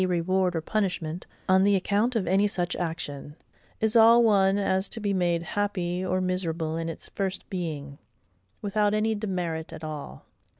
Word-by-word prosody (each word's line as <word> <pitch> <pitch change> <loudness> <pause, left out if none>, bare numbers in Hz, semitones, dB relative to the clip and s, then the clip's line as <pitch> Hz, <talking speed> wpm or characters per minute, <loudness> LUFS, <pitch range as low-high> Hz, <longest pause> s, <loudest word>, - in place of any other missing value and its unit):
reward 180 0 +1
or 165 - 0
punishment, 180 -3 -2 0.2
on 190 0 +5
the 200 0 +4
account 205 +6 +1
of 210 -5 +1
any 195 +4 +3
such 175 -4 -2
action, 150 -4 -4 0.4
is 220 +1 +1
all 230 +1 +7
one 200 -3 +4
as 190 -1 0
to 230 - -3
be 205 -2 -1
made 175 -3 +1
happy 185 -3 -2
or 185 0 0
miserable 170 -3 -2
in 165 0 -3
its 165 - -8
first 190 -1 -3
being, 150 -6 -4 0.6
without 205 0 +1
any 220 +1 +1
demerit 180 -6 -3
at 160 - -9
all. 150 - -7
185 Hz, 165 wpm, -27 LUFS, 165-205 Hz, 0.6 s, all